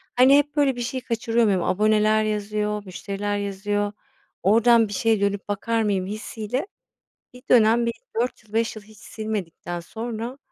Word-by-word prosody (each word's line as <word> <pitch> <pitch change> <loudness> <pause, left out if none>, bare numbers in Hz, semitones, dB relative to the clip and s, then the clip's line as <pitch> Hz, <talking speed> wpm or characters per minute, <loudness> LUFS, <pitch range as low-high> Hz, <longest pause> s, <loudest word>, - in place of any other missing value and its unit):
Hani, 260 +3 +7
hep, 290 +1 0
böyle, 280 -3 +3
bir 245 - -5
şeyi 255 +2 -3
kaçırıyor 230 -1 0
muyum, 190 -4 +2
aboneler 215 +3 +3
yazıyor, 210 0 -2
müşteriler 200 +2 -4
yazıyor, 205 +1 -2 0.5
oradan 230 +2 +5
bir 205 - -7
şeye 220 0 +1
dönüp 200 0 -1
bakar 225 +3 0
mıyım 195 -3 0
hissiyle 215 - -4 0.7
bir 250 - -13
dönem 235 0 +5
bir 235 - -1 0.3
4 245 -3 -3
yıl, 215 0 -22
5 225 0 0
yıl 215 - -9
hiç 215 0 -18
silmedikten 205 -6 -5
sonra 230 +7 -6
215 Hz, 160 wpm, -24 LUFS, 205-235 Hz, 0.7 s, Hani